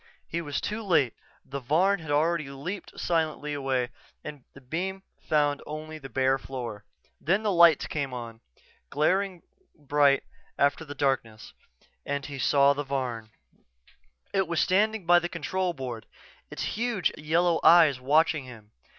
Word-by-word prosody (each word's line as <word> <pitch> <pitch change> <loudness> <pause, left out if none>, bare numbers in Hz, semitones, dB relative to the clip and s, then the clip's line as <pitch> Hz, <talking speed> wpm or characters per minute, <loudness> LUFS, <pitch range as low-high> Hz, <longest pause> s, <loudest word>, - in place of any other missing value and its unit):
He 170 - -3
was 145 -3 -3
too 215 +2 -3
late 165 - +2 0.3
the 140 +1 -5
Varn 175 +10 +2
had 160 -2 -10
already 155 0 +1
leaped 150 +9 -7
silently 155 -3 -1
away 135 -3 -1 0.3
and 150 -3 -8
the - - -11
beam 185 +8 -4 0.2
found 145 -2 +1
only 155 +1 -7
the 135 -2 -10
bare 135 0 +1
floor. 120 -6 -7 0.3
Then 195 +7 +1
the 210 - +1
lights 170 -3 +6
came 145 -3 -3
on, 115 -2 -7 0.5
glaringly 185 +4 0 0.3
bright 145 -1 +3 0.3
after 140 +3 +2
the 145 -2 -9
darkness, 130 -6 -2 0.5
and 140 0 -3
he 140 -2 -7
saw 140 +3 +4
the 145 +1 -3
Varn. 125 -5 -3 1.0
It 190 -2 +1
was 170 -1 -1
standing 210 +1 +2
by 175 +1 +6
the 175 0 -4
control 180 +2 -2
board, 125 -6 -6 0.4
its - - -5
huge 230 -4 -1
yellow 165 +2 +1
eyes 160 -6 +6
watching 150 +1 +2
him. 110 -4 -13
150 Hz, 150 wpm, -27 LUFS, 135-170 Hz, 1.0 s, lights